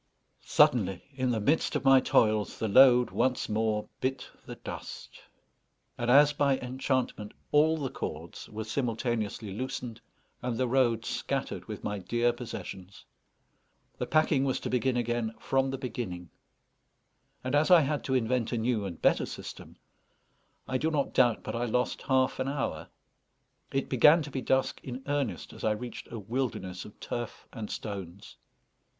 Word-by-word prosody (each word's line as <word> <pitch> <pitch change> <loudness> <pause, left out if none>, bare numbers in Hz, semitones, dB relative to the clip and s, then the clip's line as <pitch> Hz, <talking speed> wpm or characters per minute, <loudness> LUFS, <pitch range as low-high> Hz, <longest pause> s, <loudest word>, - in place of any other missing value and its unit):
Suddenly, 95 -7 +3
in 130 -1 -1
the 115 -2 +1
midst 145 +10 +1
of - - -1
my 135 0 +8
toils, 110 -4 +2
the 110 - -1
load 125 +2 +6
once 130 -1 +1
more 110 0 0
bit 130 +1 -2 0.2
the - - -6
dust, - - -8 0.7
and, 120 0 -2
as 145 +3 +7
by 140 -2 +2
enchantment, 130 -4 -2 0.2
all 155 +2 +4
the 140 -4 -3
cords 80 +3 -6
were 110 +1 -5
simultaneously 115 -3 -2
loosened, 120 0 -5 0.4
and 120 -2 -2
the 130 0 +1
road 120 -3 +2
scattered - - -3
with - - -7
my 105 -1 -2
dear 120 +6 +1
possessions. 100 -5 -8 0.9
The - - -2
packing 155 -3 +3
was 135 -2 0
to - - -4
begin 125 0 +1
again 120 -1 -1
from 135 0 +1
the 135 - -3
beginning; 105 -9 -5 1.1
and 130 +1 -3
as 150 +3 +3
I 175 -2 +8
had 145 0 -1
to 130 - 0
invent 125 -1 +1
a 120 - 0
new 110 -2 0
and 85 -4 -6
better - - +3
system, - - -9 0.9
I 130 - -1
do 160 - +1
not 150 -3 -1
doubt 120 -3 +3
but - - -4
I 120 +1 0
lost 125 +2 0
half 130 -1 +1
an 130 - -1
hour. 120 - -3 0.8
It 135 0 -1
began 150 +6 +6
to 145 - -8
be 130 - -3
dusk 130 +1 0
in 130 +1 -6
earnest 140 - -2
as - - -11
I 110 - +3
reached 120 +3 -7
a 115 - -5
wilderness 105 -5 -3
of 105 - -14
turf 120 -1 -5
and 110 -4 -6
stones. 100 -3 -7
125 Hz, 160 wpm, -29 LUFS, 110-135 Hz, 1.1 s, my